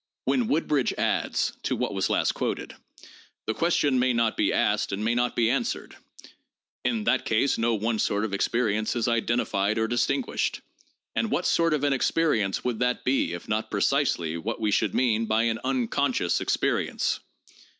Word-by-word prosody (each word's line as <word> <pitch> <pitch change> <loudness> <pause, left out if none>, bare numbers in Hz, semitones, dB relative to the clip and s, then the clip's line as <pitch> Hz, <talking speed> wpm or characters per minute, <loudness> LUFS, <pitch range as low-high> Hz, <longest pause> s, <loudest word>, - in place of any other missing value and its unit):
When 245 -3 +1
Woodbridge 150 - +1
adds - - 0
(to - - -1
what - - -2
was - - 0
last - - +2
quoted): - - -4 0.7
"The 110 - -1
ques 170 +8 +1
tion 135 -3 +2
may 125 0 +2
not 115 -1 +1
be - - +1
asked - - +1
and 100 +2 -2
may 115 - +2
not 120 0 0
be 115 -1 +3
answered. 135 - -2 0.9
In 225 -3 0
that - - +2
case 115 +5 +1
no 115 0 +2
one 110 +1 -1
sort 105 +1 0
of 105 - -5
experience 110 +1 0
is 120 - 0
identified 115 -3 0
or 110 0 +1
distinguished. 120 - -1 0.5
And 225 - 0
what 180 - -1
sort 165 -2 +3
of 145 - -3
an 145 -1 +3
experience 130 -8 +1
would 120 -3 -2
that 125 0 0
be 130 -8 +1
if 85 - -7
not 110 +1 -1
precisely 80 -1 0
what 110 +8 -4
we 110 -2 0
should - - +1
mean 115 -3 +1
by 110 +1 +2
an 115 -1 0
unconscious 130 -6 0
experience?" - - 0
115 Hz, 175 wpm, -26 LUFS, 110-135 Hz, 0.9 s, be